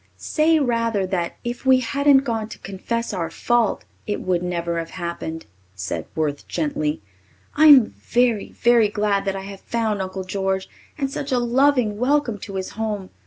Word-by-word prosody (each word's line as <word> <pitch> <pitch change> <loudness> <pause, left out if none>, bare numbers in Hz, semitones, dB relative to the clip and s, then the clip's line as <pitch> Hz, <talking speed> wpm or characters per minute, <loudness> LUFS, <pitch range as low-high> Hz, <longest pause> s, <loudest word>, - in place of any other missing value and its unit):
"Say 320 +1 +2
rather 230 -6 +1
that 180 -2 -2
if 240 0 -4
we 260 -1 +5
hadn't 280 +2 +4
gone 225 -4 -2
to - - -9
confess 210 +5 -4
our 170 -4 -2
fault, 235 +5 0 0.2
it 205 - -1
would 180 -2 0
never 170 -1 -2
have 165 - -5
happened," 170 -2 -5 0.3
said 95 0 -4
Worth 150 -2 -2
gently. 150 -5 -2 0.5
"I'm 290 -5 +8
very, 240 -2 0
very 235 -3 +4
glad 205 -1 0
that 195 0 -1
I 190 - -5
have 195 0 -9
found 220 -4 -1
Uncle 190 0 -4
George 190 0 -2 0.3
and 275 -2 -2
such 275 0 -4
a 255 - +3
loving 245 -3 +2
welcome 255 -4 +1
to 195 +1 -8
his 190 -1 -3
home. 210 -3 -4
210 Hz, 165 wpm, -22 LUFS, 185-240 Hz, 0.5 s, I'm